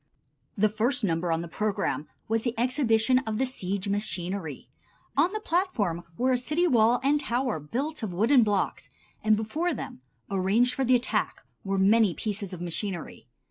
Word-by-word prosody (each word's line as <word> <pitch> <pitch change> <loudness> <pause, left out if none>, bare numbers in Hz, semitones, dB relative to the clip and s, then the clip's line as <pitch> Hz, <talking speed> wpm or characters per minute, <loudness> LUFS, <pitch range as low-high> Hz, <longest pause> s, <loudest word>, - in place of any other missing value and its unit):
The 215 +2 +4
first 225 +4 0
number 170 -2 0
on 165 0 0
the 170 - -6
program 195 -4 -2 0.2
was 225 0 +1
the 240 -2 -2
exhibition 250 -1 +3
of 220 -5 -3
the 265 - +2
siege 200 -6 -3
machinery. 190 -6 -3 0.5
On 325 +6 +3
the 430 - -3
platform 260 - -1
were 255 +1 +2
a 250 - +2
city 305 +7 0
wall 240 -5 +4
and 290 +2 +3
tower 250 - -1
built 265 - -3
of 215 -4 -3
wooden 230 +9 +4
blocks, 205 -3 0 0.3
and 215 0 +4
before 305 +10 -1
them, 130 - -7 0.3
arranged 200 +6 +2
for 270 - -1
the 255 0 +4
attack, 245 0 -1 0.2
were 195 0 -1
many 200 0 +4
pieces 205 -3 -3
of 180 -2 -7
machinery. 175 - -4
220 Hz, 170 wpm, -27 LUFS, 195-255 Hz, 0.5 s, The